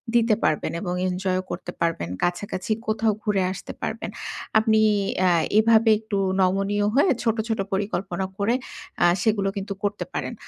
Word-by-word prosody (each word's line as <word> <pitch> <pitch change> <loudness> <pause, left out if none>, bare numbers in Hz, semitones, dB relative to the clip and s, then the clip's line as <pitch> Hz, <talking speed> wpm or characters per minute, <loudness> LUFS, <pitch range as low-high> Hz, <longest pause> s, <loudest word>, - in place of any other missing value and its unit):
দিতে 230 -2 +4
পারবেন 155 - +1
এবং 180 -3 -2 0.2
এনজয়ও 185 0 -1
করতে - - -5
পারবেন। 165 - 0
কাছাকাছি 185 +3 -2 0.2
কোথাও 220 0 +2
ঘুরে 205 -3 +1
আসতে 190 - -7
পারবেন। - - -3 0.5
আপনি 220 0 +3 0.5
আ - - +5 0.3
এভাবে 225 0 +5
একটু 215 -2 -3 0.2
নমনীয় 195 +2 +1
হয়ে 285 +7 +4
ছোট, 225 -1 +1
ছোট, 225 -2 -1
পরিকল্পনা 190 -2 -2
করে, 210 +4 +1 0.5
আ - - +6 0.2
সেগুলো 200 -1 +1
কিন্তু 200 0 -3
করতে 205 -3 -1
পারেন। - - -3
200 Hz, 150 wpm, -24 LUFS, 185-220 Hz, 0.5 s, আ